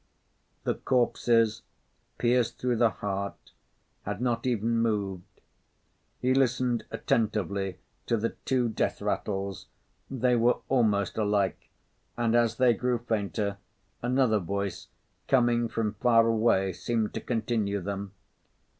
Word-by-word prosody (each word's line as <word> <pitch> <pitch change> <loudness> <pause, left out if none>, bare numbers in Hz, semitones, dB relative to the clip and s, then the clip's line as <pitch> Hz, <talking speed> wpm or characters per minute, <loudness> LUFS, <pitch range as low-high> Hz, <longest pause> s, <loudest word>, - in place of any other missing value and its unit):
The - - +1
corpses, 115 -3 +2 0.6
pierced 120 -1 +1
through 125 -2 0
the 115 0 +4
heart, 100 -1 -5 0.5
had - - -4
not 120 0 -1
even 115 -1 +1
moved. 100 -5 -2 0.8
He 130 +1 +2
listened 125 -2 +1
attentively 100 -4 -1 0.3
to 115 - +2
the 115 +2 0
two 130 -2 +1
death 110 - -1
rattles, 100 -2 -3 0.4
they 125 -1 +1
were 120 +1 +3
almost 110 -7 +2
alike, 105 -4 0 0.5
and 120 -1 +1
as 115 -2 +3
they 125 -2 +5
grew 125 +1 0
fainter, 105 -3 -2 0.4
another 125 -3 +2
voice, 100 +2 -3 0.4
coming 120 -2 +3
from 110 -2 -1
far 115 +1 +4
away, 110 -4 +2
seemed 110 +2 -1
to - - -4
continue 110 -3 -1
them. 100 +1 -5
115 Hz, 120 wpm, -28 LUFS, 100-120 Hz, 0.8 s, they